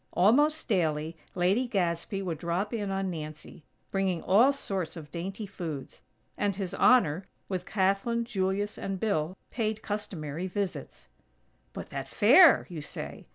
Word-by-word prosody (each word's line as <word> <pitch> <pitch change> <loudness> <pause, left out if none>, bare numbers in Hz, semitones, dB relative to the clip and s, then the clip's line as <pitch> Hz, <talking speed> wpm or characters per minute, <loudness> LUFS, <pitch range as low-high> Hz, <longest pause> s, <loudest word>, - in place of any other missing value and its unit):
Almost 290 - +4
daily 160 -6 0 0.2
Lady 190 +8 +2
Gadsby 190 -1 -1
would 170 -4 -3
drop 180 +6 -2
in 205 -3 -2
on 195 -1 -1
Nancy, 155 -1 -8 0.3
bringing 190 -3 0
all 230 +9 +5
sorts 190 - -3
of 150 -2 -10
dainty 190 +5 -5
foods; 165 -8 -7 0.3
and 200 -2 0
His 190 -1 -4
Honor, 195 -8 +4 0.2
with 185 -2 -4
Kathlyn, 200 +4 +1
Julius 205 -2 -1
and 195 -1 -3
Bill, 185 -4 -1
paid 220 -2 -2
customary 180 -6 -4
visits. 195 0 -4 0.6
"But - - -8
that - - -4
fair!" 275 - +7
you 170 -5 -6
say. 150 - -7
195 Hz, 140 wpm, -29 LUFS, 170-210 Hz, 0.6 s, fair